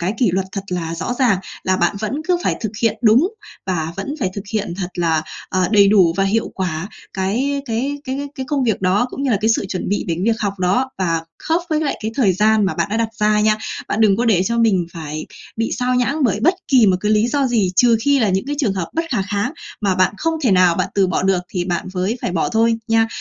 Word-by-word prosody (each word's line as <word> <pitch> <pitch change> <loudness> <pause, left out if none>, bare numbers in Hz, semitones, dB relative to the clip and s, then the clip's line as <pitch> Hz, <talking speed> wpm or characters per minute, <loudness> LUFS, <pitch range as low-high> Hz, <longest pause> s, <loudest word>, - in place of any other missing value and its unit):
cái 185 +5 -1
kỷ 230 -8 +3
luật 190 +1 -1
thật 195 - -3
là 165 -2 -3
rõ 185 +8 -3
ràng. 235 -8 +3 0.3
Là 185 0 +2
bạn 175 +2 +1
vẫn 215 +3 -2 0.2
cứ 355 - +4
phải - - +1
thực 220 -2 -3
hiện 230 - +2
đúng 240 - +5 0.4
và 165 -3 -2
vẫn 195 +9 -4
phải 190 -5 0
thực 200 - -5
hiện 205 -5 -2
thật 185 -2 -3
là, 165 -3 +1 0.3
à, 185 - 0
đầy 200 -1 +6
đủ 190 -5 +5
và 195 - +2
hiệu 220 +3 0
quả 180 -1 -3 0.2
cái 255 +9 -1
cái 270 +4 -2
cái 275 +2 -4
cái 260 -1 -5
công 285 -3 0
việc 220 -6 0
đó, 195 +6 +2
cũng 275 - -5
như 270 - +1
là 210 - +3
cái 220 - +1
sự 225 -3 +1
chuẩn 185 - -3
bị 205 - -1
đến 170 +3 -1
việc 225 0 +1
học 200 -2 -2
đó 195 +9 +1
và 165 -3 0 0.2
khớp 330 +2 +1
với 310 0 +1
lại 295 - -1
cái 220 - -2
thời 220 -8 +3
gian 215 +3 +3
mà 190 - 0
bạn - - 0
đã 220 - 0
đặt 230 -1 0
ra 210 0 +3
nha. 215 0 +3 0.3
Bạn 220 - -1
đừng 205 -3 +4
có 240 - 0
để 195 -6 +3
cho 235 +4 -1
mình 195 -7 +2
phải 155 -2 -6 0.3
bị 225 0 -1
sao 250 0 0
nhãng 260 +5 +1
bởi 210 -2 +1
bất 350 +5 +4
kỳ 250 -7 +5
một 185 - +4
cái 210 +2 +1
lý 215 +2 +3
do 280 +1 +1
gì. 220 -7 +1
Trừ 235 +1 +5
khi 285 +1 +3
là 220 -4 +2
những 190 +5 0
cái 290 - -2
trường 240 -10 +1
hợp 180 -3 -3
bất 330 +1 0
khả 215 -6 +1
kháng 205 +6 -2 0.3
mà 195 -3 +1
bạn 185 +2 +2
không 325 +5 -1
thể 245 - +3
nào 180 -2 +5
bạn - - -1
từ 195 -2 +3
bỏ 180 - -1
được, 190 -1 +2
thì 180 -2 -2
bạn 175 -1 -2
mới 190 +6 -1
phải - - -2
bỏ 165 - 0
thôi, 225 +1 +2
nha. 225 0 +3
210 Hz, 265 wpm, -19 LUFS, 185-240 Hz, 0.4 s, đầy